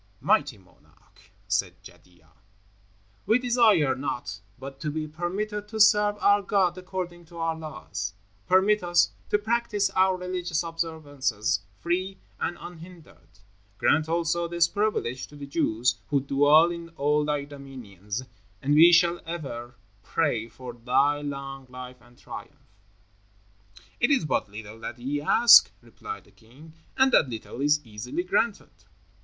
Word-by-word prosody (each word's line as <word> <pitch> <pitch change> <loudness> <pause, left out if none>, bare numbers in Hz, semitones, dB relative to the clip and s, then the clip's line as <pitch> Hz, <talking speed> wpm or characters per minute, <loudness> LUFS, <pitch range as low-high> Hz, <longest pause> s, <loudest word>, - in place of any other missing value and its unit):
"Mighty 145 -6 +1
monarch," 95 -2 -25 0.2
said - - 0
Jadua, 85 -3 -18 1.0
"we 225 - +5
desire 230 - +3
naught 130 -4 -5 0.2
but 135 +1 -9
to 150 - -3
be 155 +1 -3
permitted 200 +6 -4
to 220 +1 -6
serve 210 0 +5
our 205 0 +4
God 195 -3 +1
according 180 -2 -6
to 170 +1 -14
our 165 -1 -1
laws. 135 -11 -6 0.3
Permit 195 +3 +4
us 175 -1 +3 0.2
to - - +3
practice 210 -2 0
our 190 -1 +3
religious 180 -3 -2
observances 145 -9 -2 0.2
free 185 +3 -1 0.2
and 175 - -2
unhindered. 165 - -13 0.5
Grant 155 +1 +2
also 170 +1 0
this 170 0 +2
privilege 200 - -2
to 145 - -15
the 145 -1 -8
Jews 125 -5 0
who 145 - +2
dwell 145 +5 +4
in 170 -1 -7
all 150 +1 +2
thy 150 -1 -1
dominions, 125 -7 -8 0.4
and 145 +2 0
we 165 +3 +8
shall 170 0 +4
ever 130 -7 -6 0.3
pray 120 -4 -1
for 125 -1 -9
thy 135 +5 +1
long 135 -2 -6
life 125 0 -10
and 120 0 -21
triumph." 135 -7 -11 1.3
"It - - +3
is 275 - +2
but 150 - -1
little 110 +1 -10
that 115 +1 -7
ye 140 +4 -3
ask," 235 +10 +7
replied 440 0 -9
the - - -23
king, 135 +8 -17 0.2
"and 265 0 +4
that 140 - +4
little 115 +2 -7
is 150 0 +2
easily 115 +9 -5
granted." 205 +4 -1
155 Hz, 140 wpm, -26 LUFS, 130-180 Hz, 1.3 s, we